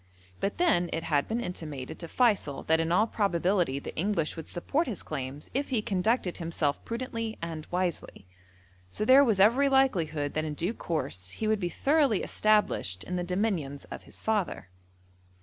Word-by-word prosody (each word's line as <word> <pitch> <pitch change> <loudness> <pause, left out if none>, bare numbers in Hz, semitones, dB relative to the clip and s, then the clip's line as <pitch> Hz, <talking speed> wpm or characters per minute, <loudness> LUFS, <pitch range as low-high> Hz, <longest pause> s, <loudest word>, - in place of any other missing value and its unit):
But 200 - -2
then 180 - +3
it 165 - -2
had 145 -3 +1
been 225 +2 -1
intimated 155 - -6
to 170 - -6
Feysul 205 - +1
that 160 0 +3
in 165 0 0
all 210 +5 +4
probability 180 -7 +1
the 140 - -7
English 170 -3 0
would 160 -2 -7
support 280 - -1
his 220 -7 -3
claims 140 -1 -5
if 280 +2 -1
he 235 -5 0
conducted 195 0 0
himself 165 -4 -1
prudently 230 -2 -4
and 165 -2 -6
wisely. 180 - -3 0.6
So 215 - -2
there 265 +4 +8
was 220 -7 +2
every 245 +8 +5
likelihood 165 - +2
that 155 - -1
in 155 -1 -4
due 175 +8 -1
course 95 - -3
he 215 - -3
would 215 -1 +2
be 175 -3 -1
thoroughly 275 - +2
established 210 - +1
in 180 - -4
the 180 - -1
dominions 175 -7 -2
of - - -6
his - - -11
father. 210 - -1
180 Hz, 175 wpm, -29 LUFS, 160-220 Hz, 0.6 s, there